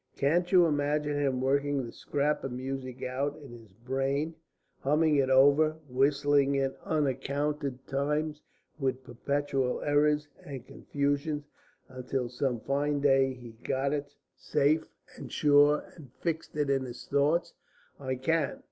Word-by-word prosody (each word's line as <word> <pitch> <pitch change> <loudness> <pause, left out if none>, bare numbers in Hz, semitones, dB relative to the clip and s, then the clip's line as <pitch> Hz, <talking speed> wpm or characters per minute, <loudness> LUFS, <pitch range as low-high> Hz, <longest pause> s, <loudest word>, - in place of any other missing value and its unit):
Can't 175 +6 +1
you 180 -2 +7
imagine 150 -1 0
him 135 -3 0
working 140 0 +1
the 115 - -8
scrap 145 +4 -1
of 135 - -3
music 130 0 -5
out 140 +3 -2
in 140 -5 -12
his 115 -2 -12 0.2
brain, 135 +4 -1 0.5
humming 150 +2 +2
it 135 -1 +2
over, 140 +4 +5
whistling 140 +1 +2
it 135 -1 0
uncounted 140 -2 -1
times 150 +2 -1 0.4
with 130 -1 -1
perpetual 135 0 -1
errors 150 0 +2 0.2
and 135 -4 -8
confusions, 145 +1 -2 0.4
until 130 -1 -3
some 125 -1 -2
fine 145 +1 0
day 135 -2 +3
he 120 -2 -11
got 135 +1 0
it 145 -1 -4 0.2
safe 150 +2 +1 0.3
and - - -9
sure 145 0 +4
and 140 -7 -13
fixed 160 -2 -3
it 145 -2 +1
in 135 -1 +1
his 120 -1 -9
thoughts? 155 +5 +1 0.5
I 130 -2 -2
can. 140 +3 0
140 Hz, 140 wpm, -29 LUFS, 135-150 Hz, 0.5 s, you